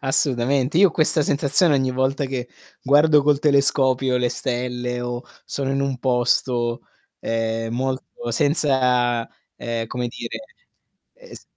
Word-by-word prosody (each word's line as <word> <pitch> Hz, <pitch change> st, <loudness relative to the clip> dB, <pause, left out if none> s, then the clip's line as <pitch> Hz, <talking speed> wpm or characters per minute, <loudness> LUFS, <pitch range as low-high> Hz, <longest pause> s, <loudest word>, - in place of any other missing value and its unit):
Assolutamente. 135 Hz, +2 st, +1 dB
Io 195 Hz, -1 st, +7 dB
ho -, -, -7 dB
questa 155 Hz, -1 st, +1 dB
sensazione 145 Hz, +3 st, +2 dB
ogni 130 Hz, -1 st, +1 dB
volta 130 Hz, +2 st, 0 dB
che 125 Hz, -2 st, -4 dB, 0.3 s
guardo 150 Hz, +2 st, +4 dB
col 145 Hz, 0 st, +3 dB
telescopio 135 Hz, -3 st, +2 dB
le 125 Hz, -1 st, +1 dB
stelle, 125 Hz, -1 st, -3 dB
o 120 Hz, 0 st, -4 dB, 0.2 s
sono 135 Hz, -1 st, -3 dB
in 135 Hz, -, 0 dB
un 135 Hz, -2 st, -2 dB
posto, 120 Hz, -1 st, 0 dB, 0.4 s
ehm, 115 Hz, 0 st, -2 dB
molto 130 Hz, -2 st, -4 dB
senza, 125 Hz, -4 st, +1 dB, 0.3 s
ehm, 115 Hz, -1 st, -4 dB
come 120 Hz, +1 st, -3 dB
dire, 115 Hz, 0 st, -6 dB, 0.8 s
es -, -, -14 dB
130 Hz, 130 wpm, -22 LUFS, 120-140 Hz, 0.8 s, Io